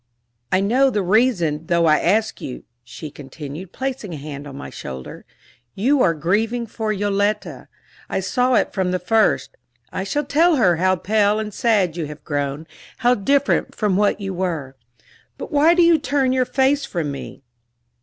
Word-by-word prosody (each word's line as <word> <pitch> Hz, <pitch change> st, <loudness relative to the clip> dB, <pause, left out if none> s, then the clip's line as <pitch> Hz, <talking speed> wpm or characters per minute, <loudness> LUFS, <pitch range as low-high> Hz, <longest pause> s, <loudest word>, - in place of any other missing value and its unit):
"I 185 Hz, -, +3 dB
know 255 Hz, +7 st, +3 dB
the 210 Hz, -6 st, -1 dB
reason, 180 Hz, -7 st, +1 dB
though 170 Hz, -1 st, +2 dB
I 155 Hz, -1 st, +4 dB
ask 215 Hz, +5 st, +1 dB
you," 125 Hz, -, -7 dB, 0.2 s
she 145 Hz, +5 st, -9 dB
continued, 145 Hz, +6 st, -9 dB
placing 255 Hz, -9 st, -4 dB
a -, -, -6 dB
hand 145 Hz, 0 st, -8 dB
on 140 Hz, -, -9 dB
my 145 Hz, -, -8 dB
shoulder. 65 Hz, -1 st, -8 dB, 0.5 s
"You 255 Hz, +7 st, +2 dB
are 165 Hz, -6 st, +3 dB
grieving 215 Hz, +9 st, 0 dB
for 220 Hz, -1 st, -3 dB
Yoletta 205 Hz, +1 st, -1 dB, 0.4 s
I -, -, -1 dB
saw 250 Hz, -1 st, +1 dB
it -, -, +1 dB
from 190 Hz, -2 st, 0 dB
the 185 Hz, -, 0 dB
first. 215 Hz, +5 st, +1 dB, 0.4 s
I 190 Hz, -, -3 dB
shall 290 Hz, +9 st, -2 dB
tell 325 Hz, +4 st, +3 dB
her 185 Hz, -, +3 dB
how 185 Hz, +2 st, +2 dB
pale 205 Hz, +3 st, +2 dB
and 215 Hz, -1 st, -4 dB
sad 195 Hz, -8 st, +1 dB
you 160 Hz, -3 st, -3 dB
have 150 Hz, 0 st, -10 dB
grown 145 Hz, 0 st, -3 dB, 0.4 s
how 245 Hz, -, +6 dB
different 275 Hz, +6 st, +1 dB
from 210 Hz, -4 st, 0 dB
what 205 Hz, +1 st, +2 dB
you 195 Hz, -1 st, -4 dB
were. 165 Hz, -7 st, -3 dB, 0.6 s
But -, -, -7 dB
why 305 Hz, +4 st, +5 dB
do 350 Hz, -, +5 dB
you 335 Hz, -1 st, +5 dB
turn 280 Hz, -3 st, +1 dB
your 255 Hz, -1 st, +2 dB
face 270 Hz, +3 st, +1 dB
from 160 Hz, -5 st, -3 dB
me?" 140 Hz, 0 st, -8 dB
200 Hz, 175 wpm, -21 LUFS, 165-245 Hz, 0.6 s, how